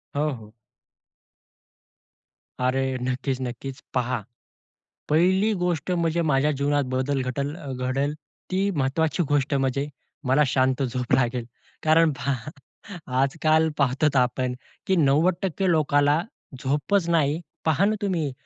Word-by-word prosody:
हो, 150 +2 +1
हो. 110 -2 -13 2.1
अरे! 130 0 0
नक्कीच, 130 +1 -1
नक्कीच. 130 +1 -6
पहा, 125 -2 0 0.9
पहिली 190 +7 +3
गोष्ट 180 -3 -1
म्हणजे 170 -1 +1
माझ्या 150 -2 +2
जीवनात 145 0 +1
बदल 130 +1 0
घटल 140 +3 -2 0.3
घडेल 140 +3 0 0.4
ती 195 +2 +1
महत्त्वाची 155 +5 +1
गोष्ट 145 0 +1
म्हणजे 135 +1 0 0.4
मला 135 +4 +4
शांत 130 0 +1
झोप 125 -1 -2
लागेल. 125 -2 0 0.4
कारण 160 0 +5
पहा 135 0 -3 0.7
आज-काल 155 +3 +2
पाहतोत 140 +2 +2
आपण, 125 0 +1 0.3
की 190 - +3
90% 175 +5 +2
लोकाला 145 -1 +3 0.4
झोपच 165 +7 +1
नाही. 155 -2 +2 0.3
पहा 160 +5 +3
ना, 215 - +2
तुम्ही 175 -8 -1
145 Hz, 115 wpm, -25 LUFS, 130-160 Hz, 2.1 s, कारण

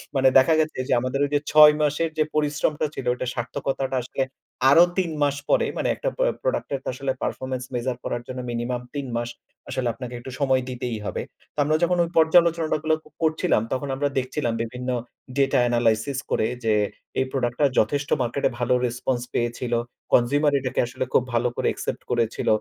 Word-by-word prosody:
মানে 135 0 +4
দেখা 145 +5 +5
গেছে 155 0 0
যে - - +2
আমাদের 130 +3 -2
ওই 145 - -4
যে - - +4
৬ 150 0 +9
মাসের 150 +2 +1
যে 155 - +4
পরিশ্রমটা 150 0 +1
ছিল 130 - -6
ওইটার 125 0 -2
সার্থকতাটা 135 +2 -2
আসলে 135 +2 -2 0.5
আরো 165 +5 +8
৩ 180 -3 +1
মাস 140 -1 +2
পরে - - +4
মানে - - 0
একটা - - -2
প - - -26 0.2
প্রোডাক্ট - - -1
এর 135 - -1
তো - - -9
আসলে 135 +1 -2
পারফরম্যান্স 130 -1 -3
মেজার 125 +1 -1
করার 120 - -2
জন্য 130 0 -5
মিনিমাম 120 +1 -2
৩ 140 -2 -3
মাস 120 0 -2 0.4
আসলে 125 -2 -1
আপনাকে 125 +1 -7
একটু 130 +2 -8
সময় 135 -2 +3
দিতেই 125 -2 -3
হবে। - - -3 0.3
তো - - -47
আমরা 155 +2 +2
যখন 175 +1 +2
ওই 170 - -3
পর্যালোচনাটা 165 0 +4
গুলো 160 0 +3 0.3
করছিলাম 160 -4 +2
তখন 140 +2 -2
আমরা 145 +1 0
দেখছিলাম 130 -1 -1
বিভিন্ন 125 +2 -5 0.5
ডেটা 135 -2 +3
এনালাইসিস 120 +2 +1
করে 110 - +2 0.2
যে, 110 -1 +2 0.5
এই 130 - +2
প্রোডাক্ট 120 -3 -1
টা 145 - +6
যথেষ্ট 140 +6 0
মার্কেটে 120 +3 0
ভালো 125 +1 +2
রেসপন্স 120 +1 -1
পেয়েছিল। 120 +1 -1 0.4
কনসিউমার 145 +5 +4
এটাকে 130 -1 -3
আসলে 130 +1 -3
খুব 125 - +4
ভালো 120 +1 +2
করে - - 0
অ্যাকসেপ্ট - - -3
করেছিল। 115 -2 0
130 Hz, 185 wpm, -24 LUFS, 120-145 Hz, 0.5 s, ৬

